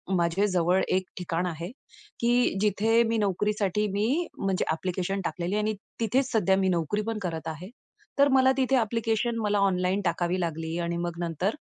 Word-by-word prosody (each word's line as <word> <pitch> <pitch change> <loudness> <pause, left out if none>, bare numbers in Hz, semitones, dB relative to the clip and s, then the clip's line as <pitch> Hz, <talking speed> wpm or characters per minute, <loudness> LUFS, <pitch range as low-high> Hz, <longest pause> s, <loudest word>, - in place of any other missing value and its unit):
माझ्या 170 +3 +2
जवळ 180 +1 +3
एक 185 0 +1
ठिकाण 175 -1 -2
आहे, 170 0 -5 0.5
की 240 -1 +3
जिथे 220 +2 +3
मी 230 - +1
नोकरीसाठी 205 0 0
मी 255 - +1
म्हणजे 195 -2 0
ॲप्लिकेशन 185 +3 -2
टाकलेली 175 +3 -2
आहे. 210 - +1
आणि 215 0 0 0.3
तिथेच 250 +4 +1
सध्या 195 -5 +3
मी 190 -1 +2
नोकरी 175 +3 0
पण 225 -1 -2
करत 165 -3 -4
आहे. 160 +4 -6 0.5
तर 280 - +7
मला 260 0 +5
तिथे 265 0 +2
ॲप्लिकेशन 230 0 0
मला 210 -2 +1
ऑनलाईन 190 0 +1
टाकावी 175 +1 0
लागली. 165 0 -3
आणि 170 0 -2
मग 170 0 -3
नंतर 175 - -1
195 Hz, 170 wpm, -27 LUFS, 175-220 Hz, 0.5 s, तर